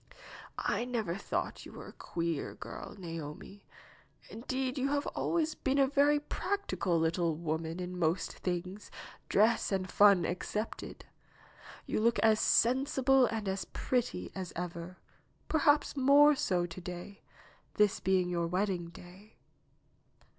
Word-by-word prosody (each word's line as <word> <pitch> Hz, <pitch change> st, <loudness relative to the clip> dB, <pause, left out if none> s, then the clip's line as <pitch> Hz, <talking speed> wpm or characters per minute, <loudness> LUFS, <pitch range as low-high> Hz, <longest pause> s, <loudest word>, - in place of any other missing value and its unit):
H 240 Hz, -, 0 dB
never 225 Hz, -8 st, -2 dB
thought 195 Hz, -, -3 dB
you -, -, -11 dB
a -, -, -10 dB
queer 170 Hz, -3 st, -3 dB
girl, -, -, -8 dB
Naomi. 165 Hz, +2 st, -8 dB, 0.7 s
Indeed, 260 Hz, +3 st, -3 dB
you 265 Hz, -, +1 dB
have 285 Hz, 0 st, 0 dB
always 320 Hz, -2 st, -1 dB
been 270 Hz, 0 st, -1 dB
a 275 Hz, -, +5 dB
very 285 Hz, +2 st, +3 dB
practical 295 Hz, -, -2 dB
little 165 Hz, 0 st, +1 dB
woman 160 Hz, +1 st, -3 dB
in 180 Hz, 0 st, -5 dB
most 170 Hz, +2 st, 0 dB
things, 185 Hz, +3 st, -4 dB, 0.4 s
dress 220 Hz, +3 st, +3 dB
and 190 Hz, -1 st, 0 dB
fun 200 Hz, -2 st, +5 dB
excepted. 210 Hz, +5 st, -4 dB, 0.8 s
You -, -, -1 dB
look 230 Hz, +2 st, +3 dB
as 220 Hz, -1 st, +5 dB
sen 255 Hz, +4 st, +3 dB
sible 270 Hz, -3 st, +3 dB
and 220 Hz, -3 st, -3 dB
as 190 Hz, 0 st, -2 dB
pretty 250 Hz, -1 st, -2 dB
as 185 Hz, -2 st, -5 dB
ever, 175 Hz, +1 st, -6 dB, 0.5 s
perhaps 295 Hz, -2 st, +2 dB
more 285 Hz, +2 st, +6 dB
so 185 Hz, -11 st, 0 dB
to 175 Hz, +1 st, -8 dB
day, 180 Hz, +3 st, -8 dB, 0.5 s
this 210 Hz, -1 st, +3 dB
being 185 Hz, -1 st, +2 dB
your 170 Hz, -1 st, -1 dB
wedding 180 Hz, -1 st, -1 dB
day. 180 Hz, +5 st, -15 dB
195 Hz, 130 wpm, -32 LUFS, 175-255 Hz, 0.8 s, more